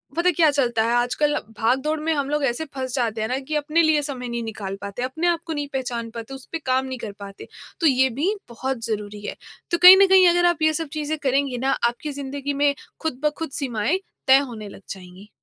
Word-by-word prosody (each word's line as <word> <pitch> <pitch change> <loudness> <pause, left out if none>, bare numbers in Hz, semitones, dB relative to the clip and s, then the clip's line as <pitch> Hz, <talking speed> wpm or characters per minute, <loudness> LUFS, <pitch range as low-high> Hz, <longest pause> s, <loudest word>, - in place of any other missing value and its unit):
पता 345 +2 +3
क्या 320 -3 +5
चलता 240 -5 +1
है 230 +1 +1
आजकल 245 +5 +1 0.2
भाग 235 +4 +2
दौड़ 305 +2 -1
में 320 +1 0
हम 280 -2 -1
लोग 295 0 0
ऐसे 255 +5 -1
फँस 260 -2 -4
जाते 230 -4 -1
हैं 220 - -1
ना 255 +3 -1
कि 285 +3 -5
अपने 300 +3 +2
लिए 315 -2 +3
समय 265 -4 -5
नहीं 235 0 -3
निकाल 210 -3 -5
पाते, 200 +4 -6
अपने 290 +7 -1
आप 340 -1 +2
को 325 - -3
नहीं 290 -1 -3
पहचान 240 -3 -3
पाते, 230 +3 -7
उस 270 -1 -9
पे 330 - -3
काम 260 0 +1
नहीं 260 -1 -5
कर 220 -3 -6
पाते, 200 -1 -10 0.3
तो 330 - +3
ये 265 -1 +4
भी 370 +8 +2 0.2
बहुत 255 0 -4
ज़रूरी 210 -2 -4
है। - - -4 0.4
तो 340 - +2
कहीं 365 +2 +10
न 395 - +6
कहीं 380 -1 +7
अगर 350 0 +3
आप 345 -3 +2
ये 315 0 +3
सब 320 0 -2
चीज़ें 310 0 -2
करेंगी 270 -1 +1
ना 265 +2 0 0.2
आपकी 290 +5 -6
ज़िंदगी 280 0 -4
में 285 0 +2 0.3
ख़ुद-ब-ख़ुद 300 +1 -2
सीमाएँ 260 - 0 0.3
तय 265 0 +8
होने 230 -7 -4
लग - - -13
जाएँगी। 185 +1 -10
270 Hz, 235 wpm, -23 LUFS, 235-310 Hz, 0.4 s, कहीं